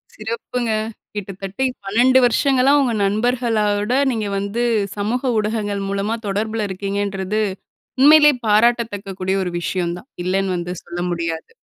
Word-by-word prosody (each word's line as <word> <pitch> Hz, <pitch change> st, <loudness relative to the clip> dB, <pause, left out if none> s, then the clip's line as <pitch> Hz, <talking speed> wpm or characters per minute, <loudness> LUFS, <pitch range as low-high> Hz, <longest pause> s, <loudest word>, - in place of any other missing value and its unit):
சிறப்புங்க. 230 Hz, +2 st, -3 dB, 0.4 s
கிட்டத்தட்ட 195 Hz, +3 st, -5 dB, 0.2 s
12 250 Hz, +6 st, +4 dB
வருஷங்களா 265 Hz, +2 st, +3 dB
உங்க 245 Hz, -4 st, +1 dB
நண்பர்களோட 215 Hz, -1 st, 0 dB, 0.2 s
நீங்க 215 Hz, -3 st, -2 dB
வந்து 200 Hz, +4 st, -2 dB, 0.3 s
சமூக 245 Hz, +5 st, -1 dB
ஊடகங்கள் 210 Hz, -2 st, -1 dB
மூலமா 200 Hz, +3 st, -1 dB
தொடர்பில 215 Hz, +1 st, -1 dB
இருக்கீங்கன்றது, 200 Hz, +1 st, -2 dB, 0.6 s
உண்மையிலேயே 295 Hz, 0 st, +7 dB
பாராட்டத்தக்கக்கூடிய 205 Hz, -4 st, +1 dB
ஒரு 180 Hz, -, -3 dB
விஷயந்தான். 175 Hz, +6 st, -3 dB
இல்லேன்னு 190 Hz, 0 st, 0 dB
வந்து 175 Hz, +1 st, -4 dB
சொல்ல 175 Hz, 0 st, -6 dB
முடியாது. 165 Hz, -1 st, -3 dB
210 Hz, 110 wpm, -20 LUFS, 195-235 Hz, 0.6 s, உண்மையிலேயே